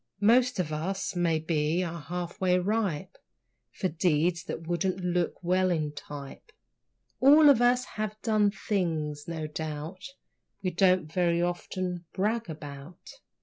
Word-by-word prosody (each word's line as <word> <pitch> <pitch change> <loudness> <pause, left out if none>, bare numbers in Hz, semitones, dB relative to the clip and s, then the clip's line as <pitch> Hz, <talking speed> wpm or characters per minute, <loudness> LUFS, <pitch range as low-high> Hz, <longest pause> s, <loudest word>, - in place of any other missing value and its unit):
Most 245 +5 +4
of 155 -4 -1
us, 190 +6 -3
maybe, 160 -1 +1
are 170 -1 -5
half 175 +4 -5
way 180 -1 +3
ripe 190 -2 -1 0.5
For 185 - -2
deeds 170 0 +1
that 165 -4 -6
would't 170 0 -1 0.2
look 180 -1 0
well 185 +1 +2
in 155 -4 0
type. 145 - -9 0.7
All 290 +2 +8
of 245 -4 +3
us 245 +1 +3
have 215 0 -5
done 215 -2 +3
things, 160 -8 -2
no 160 -2 -4
doubt, 155 +4 -5 0.6
We 185 - 0
don't 185 0 +3
very 170 +1 +1
often 175 0 -3
brag 220 +2 -1
about. 145 +2 -9
175 Hz, 135 wpm, -28 LUFS, 160-195 Hz, 0.7 s, All